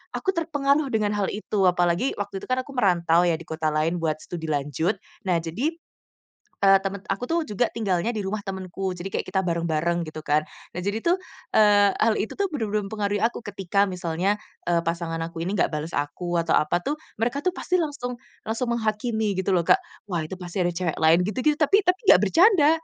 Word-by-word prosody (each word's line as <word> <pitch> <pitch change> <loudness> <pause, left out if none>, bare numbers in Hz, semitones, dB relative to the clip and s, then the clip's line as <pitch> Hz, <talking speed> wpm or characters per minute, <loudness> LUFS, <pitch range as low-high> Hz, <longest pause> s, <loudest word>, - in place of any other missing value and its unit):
aku - - -2
terpengaruh 295 -3 +1
dengan 215 -2 +1
hal 200 -2 0
itu. 210 -1 -1
Apalagi 175 +6 +2
waktu 200 -1 -4
itu - - -8
kan 255 - +2
aku 270 - -12
merantau 175 -6 +3
ya 170 -2 +2
di 170 - -11
kota 160 -1 -1
lain 155 +3 +1
buat 155 -2 -1
studi 170 0 -7
lanjut. 145 +4 0 0.3
Nah 175 -3 +2
jadi, 185 - -2 0.9
eee, 195 0 +7
teman 195 0 -4
aku 195 +4 -2
tuh 335 - +2
juga 215 +1 0
tinggalnya 200 -1 0
di 215 - -1
rumah 200 +3 -2
temanku, 190 -1 -4
jadi 180 +3 -5
kayak - - -3
kita 190 +1 0
bareng-bareng 170 0 0
gitu 155 0 -7
kan. 150 +1 +3 0.3
Nah 180 - -4
jadi 205 +3 -1
tuh, 350 +2 +3 0.4
eee, 205 -1 +6
hal 220 0 +3
itu 220 - -2
tuh 400 - +2
benar-benar 215 -7 -1
mempengaruhi 205 -1 -1
aku 235 - +1
ketika 200 -1 0
misalnya, 180 +2 -1 0.3
eee, 170 -1 +3
pasangan 165 0 -2
aku 165 0 -7
ini 185 +4 -2
enggak - - +4
bales 150 +2 -3
aku 170 +5 -2
atau 165 - +2
apa 175 +3 +2
tuh, 295 - -1 0.2
mereka 240 +5 0
tuh 365 - +3
pasti 365 - -1
langsung 285 -5 -3 0.3
langsung 230 +2 -1
menghakimi 220 -2 -1
gitu 190 +1 0
loh 180 -2 +3
Kak, - - +6 0.3
"Wah 170 -3 -1
itu 155 - -6
pasti 180 +1 -3
ada 175 - +1
cewek 170 -2 -2
lain," 160 +2 +6
gitu 210 +3 -3
gitu 300 -1 +4
tapi 395 +7 +4
tapi 360 +1 +2
enggak 180 - +6
bercanda 330 - +5
195 Hz, 205 wpm, -25 LUFS, 170-225 Hz, 0.9 s, eee